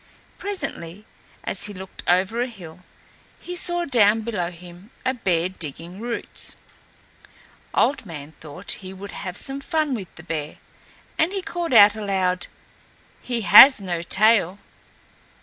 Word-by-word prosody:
Presently, 220 - -5 0.4
as 190 - -3
he 205 -1 -7
looked 190 +1 -8
over 190 +6 +2
a 250 - 0
hill 180 -9 -12 0.6
he 355 - -7
saw 350 0 -1
down 225 -5 +4
below 210 -6 -2
him 175 +3 -14 0.2
a 260 - +2
bear 180 -8 0
digging 170 +1 -9
roots. 235 +1 -2 1.2
Old 280 - +2
Man 155 -6 -9
thought 150 -2 -7
he 190 0 -8
would 195 +1 -9
have 180 -2 -6
some 275 +1 -4
fun 310 -1 0
with 200 -7 -4
the 160 - -12
bear, 155 -3 -5 0.6
and 320 +3 +3
he 390 -2 -3
called 345 -3 -4
out 205 -3 +8
aloud, 190 -4 -1 0.7
"He 240 -2 -3
has 260 +6 +9
no 180 -4 -3
tail." 195 0 +3
200 Hz, 140 wpm, -23 LUFS, 175-245 Hz, 1.2 s, has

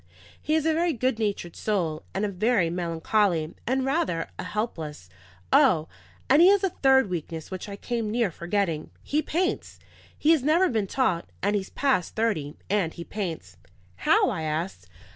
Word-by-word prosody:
He 305 - 0
is 315 -1 +1
a 320 - +3
very 335 +1 +1
good 255 0 0
natured 200 -5 -2
soul, 170 -7 -1
and 195 +3 -1
a - - -1
very 200 -2 +1
melancholy, 170 0 0
and 260 +1 +1
rather 270 - 0
a - - -3
helpless. 160 - -4 0.4
O, 160 -3 +5 0.4
and 285 +4 +6
he 350 - +8
has 400 0 +5
a 385 - +1
third 265 -5 +4
weakness 165 -2 -5
which 185 +2 -6
I 200 - -5
came 230 +1 -3
near 225 -3 +1
forgetting. 170 -2 -2
He 300 +2 0
paints. 360 +4 -2 0.4
He 310 - +3
has 320 -4 +4
never 325 +7 +3
been 220 -5 0
taught, 185 -8 0
and 205 +1 +2
he's 195 -2 -2
past 265 -11 0
thirty, 200 -11 -1
and 195 -5 0
he 170 - -6
paints." 165 - -5 0.4
"How?" - - +3
I - - -3
asked. 160 +4 -3
205 Hz, 175 wpm, -26 LUFS, 170-265 Hz, 0.4 s, he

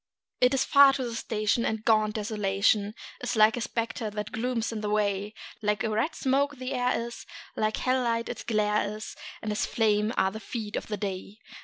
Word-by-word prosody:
It 250 +2 +4
is 265 - +2
far 280 -1 +7
to 270 - -2
the 240 -2 -4
station, 220 0 0
and 220 -1 -2
gaunt 215 -1 +3
Desolation 205 -1 +1 0.3
Is 245 0 -2
a 220 +3 +5
spectre 230 -1 -2
that 210 0 -5
glooms 230 -1 -1
in 220 -2 -4
the 210 - -2
way; 205 0 0 0.3
Like 210 +1 0
a 220 - 0
red 225 +10 0
smoke 280 +2 +1
the 255 +2 -4
air 250 -1 +1
is, 235 - -9 0.3
like 215 0 0
a - - -5
hell 255 0 +2
light 230 -1 0
its - - -5
glare 210 -2 +1
is, 215 - -8 0.3
And 215 - -2
as 210 - 0
flame 215 -1 +2
are 190 - +3
the 220 - -7
feet 220 -2 -5
of - - -3
the 210 - -3
day. 195 0 -5
220 Hz, 205 wpm, -28 LUFS, 210-240 Hz, 0.3 s, far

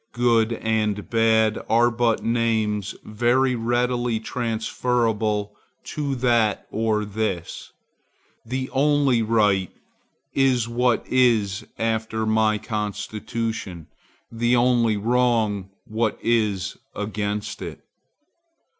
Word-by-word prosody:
Good 120 -1 +2
and 105 -2 -1
bad 110 -1 +3
are 120 +2 +4
but 120 -1 +1
names 110 -3 0
very 120 +4 +1
readily 120 0 0
transferable 110 -2 -1 0.4
to 145 -3 -2
that 120 -4 +1
or 110 -1 0
this; 105 -4 -4 0.7
the 130 +3 -3
only 140 -3 +3
right 105 -4 +2 0.6
is 130 -4 +2
what 120 0 +1
is 115 -7 +2
after 110 0 -1
my 110 0 +2
constitution; 105 -3 -4 0.5
the 120 +2 +1
only 120 -3 +3
wrong 110 -3 +1 0.2
what 110 0 -1
is 105 -5 0 0.2
against 105 0 -3
it. - - -7
115 Hz, 95 wpm, -23 LUFS, 105-120 Hz, 0.7 s, are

